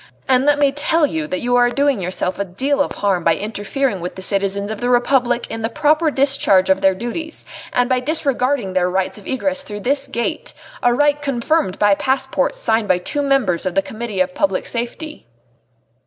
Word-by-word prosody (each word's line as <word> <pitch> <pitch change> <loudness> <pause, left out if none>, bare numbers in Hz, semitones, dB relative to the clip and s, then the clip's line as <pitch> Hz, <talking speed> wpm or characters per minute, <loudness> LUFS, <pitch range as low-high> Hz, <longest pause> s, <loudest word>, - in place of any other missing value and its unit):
And 260 +1 +3
let 290 0 +4
me 285 -1 +3
tell 300 +3 +1
you 160 - -3
that 185 +3 -3
you 245 0 +1
are 245 0 +4
doing 275 -3 +1
yourself 180 +1 -3
a - - +1
deal 265 +10 -1
of - - -1
harm 195 -4 0
by 165 -1 +3
interfering 210 +1 -2
with 180 - -5
the 190 - -7
citizens 200 +1 0
of 220 - -6
the 245 - 0
Republic 245 0 +2
in 225 - -6
the 225 - -1
proper 305 +5 +2
discharge 270 -10 +3
of 190 0 +2
their 190 -1 +3
duties, 280 - -5 0.3
and 245 0 +2
by 255 0 +1
disregarding 265 - 0
their 180 -1 +1
rights 190 +3 -2
of 200 - -13
egress 275 +1 -1
through 205 -6 -6
this 275 +4 0
gate, 310 - -4 0.3
a 245 - +3
right 290 +3 +2
confirmed 275 - 0
by 205 -1 +4
passports 265 +4 0
signed 225 -2 +1
by 185 -2 +3
two 290 +11 -3
members 270 -12 +1
of 185 -2 -2
the 195 - +2
Committee 220 -4 -4
of 180 0 0
Public 190 0 0
Safety." 245 - -4
245 Hz, 200 wpm, -19 LUFS, 195-275 Hz, 0.3 s, let